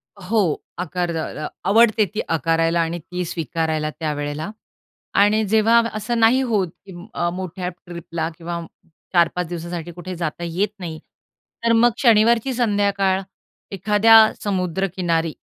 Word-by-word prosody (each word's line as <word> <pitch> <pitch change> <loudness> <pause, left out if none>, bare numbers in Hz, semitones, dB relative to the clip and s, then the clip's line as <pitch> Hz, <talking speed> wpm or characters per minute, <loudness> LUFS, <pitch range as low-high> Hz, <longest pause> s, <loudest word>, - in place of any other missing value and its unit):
हो, 200 +3 -1 0.4
आकार 180 0 -2
द्या 160 -1 -2
अ, 150 - -6
अ, - - -2 0.2
आवडते 220 0 +5
ती 215 - 0
आकारायला 165 +1 +1
आणि 165 +1 -2
ती 180 +3 -5
स्वीकारायला 160 -1 -2
त्यावेळेला. 150 +2 -3 0.7
आणि 210 +2 +4
जेव्हा 225 +2 +4
असं 215 +3 -2
नाही 230 +4 +5
होत 210 -8 0 0.2
की 190 - -10 0.2
अ, 175 - 0
मोठ्या 180 0 -5
ट्रिपला 170 -2 -6
किंवा 170 0 -4 0.5
4-5 175 0 +2
दिवसासाठी 170 0 -6
कुठे 180 +2 -7
जाता 170 0 -4
येत 180 +5 -1
नाही, 165 -4 -6 0.7
तर 230 - +4
मग 235 +1 +5
शनिवारची 230 +1 +4
संध्याकाळ 200 -4 +1 0.5
एखाद्या 215 +3 +6
समुद्रकिनारी 180 -3 -1
180 Hz, 130 wpm, -21 LUFS, 165-215 Hz, 0.7 s, एखाद्या